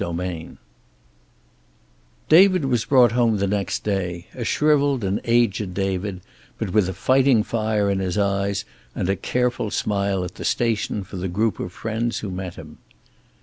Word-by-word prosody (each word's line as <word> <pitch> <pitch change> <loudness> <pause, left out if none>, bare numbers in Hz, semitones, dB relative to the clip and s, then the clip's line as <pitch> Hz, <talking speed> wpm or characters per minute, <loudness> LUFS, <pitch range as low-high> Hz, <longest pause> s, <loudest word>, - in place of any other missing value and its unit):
XXXIII 85 -1 -5 1.7
David 185 -1 +6
was 120 -5 0
brought 125 -5 +5
home 115 -2 +2
the 100 - 0
next 100 0 -2
day, 90 -4 -2
a 125 - -5
shrivelled 145 -2 +2
and 95 +1 -1
aged 110 -5 +1
David, 95 -1 -2 0.4
but 90 - -4
with 105 -4 +3
a - - -3
fighting 130 +4 +3
fire 110 -2 0
in 100 -1 0
his 95 0 -2
eyes 100 0 0 0.3
and - - -2
a - - +1
careful 125 +1 -1
smile 100 -2 -1
at 90 0 -6
the - - -8
station 110 -3 0
for 95 0 -9
the 90 +1 -3
group 105 +5 -1
of 90 - -4
friends 115 +4 -3
who 100 - -5
met 90 -1 -5
him. 75 -1 -12
100 Hz, 160 wpm, -22 LUFS, 95-120 Hz, 1.7 s, David